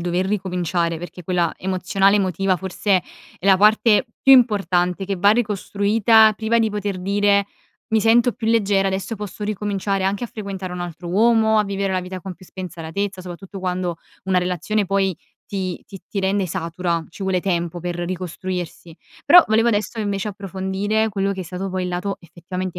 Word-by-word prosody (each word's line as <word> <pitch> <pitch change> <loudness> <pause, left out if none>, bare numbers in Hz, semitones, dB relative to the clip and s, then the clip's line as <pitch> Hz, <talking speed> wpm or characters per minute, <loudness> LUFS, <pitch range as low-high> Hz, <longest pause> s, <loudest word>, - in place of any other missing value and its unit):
dover 175 +2 0
ricominciare, 180 -4 -1
perché 175 +1 -9
quella 175 -2 0
emozionale, 190 +2 +1
emotiva 190 -1 +1
forse 190 +1 0 0.4
è - - -15
la 190 -1 +7
parte 215 +3 +4 0.2
più 270 - +7
importante 195 -6 +3
che 195 0 -2
va 200 +3 +4
ricostruita 215 0 +3
priva 225 +2 +1
di 220 -1 +2
poter 205 -2 -3
dire: 200 +1 +2 0.4
"Mi 220 0 +2
sento 235 +2 +4
più 225 - -6
leggera. 200 -4 +2
Adesso 195 +4 -3
posso 210 0 -6
ricominciare 200 -2 -2
anche 200 +4 -1
a - - -3
frequentare 195 -4 -6
un 180 - -5
altro 175 0 -6
uomo, 220 +2 +3
a 210 - +3
vivere 195 -1 -2
la 185 - 0
vita 185 0 -7
con 190 -2 -6
più 185 +1 -17
spensieratezza," 185 +2 -5
soprattutto 185 +2 -9
quando 180 -2 -2 0.3
una 190 -1 +2
relazione 180 +3 -1
poi 195 -1 +1 0.3
ti 185 -3 -4
ti 195 - -11
ti 200 - -2
rende 190 0 0
satura, 170 -1 -2
ci 195 - -10
vuole 190 -1 0
tempo 175 -2 -2
per 175 0 -3
ricostruirsi. 175 -1 -5 0.3
Però, 350 +4 +9
volevo 225 +2 +3
adesso, 215 +1 -1
invece, 200 -1 -2
approfondire 195 +2 -2
quello 200 -1 -1
che 190 - -6
è - - -3
stato 185 +2 -5
poi 185 -1 -2
il - - -3
lato 180 +3 -3
effettivamente 180 +1 -6
195 Hz, 175 wpm, -21 LUFS, 180-205 Hz, 0.4 s, Però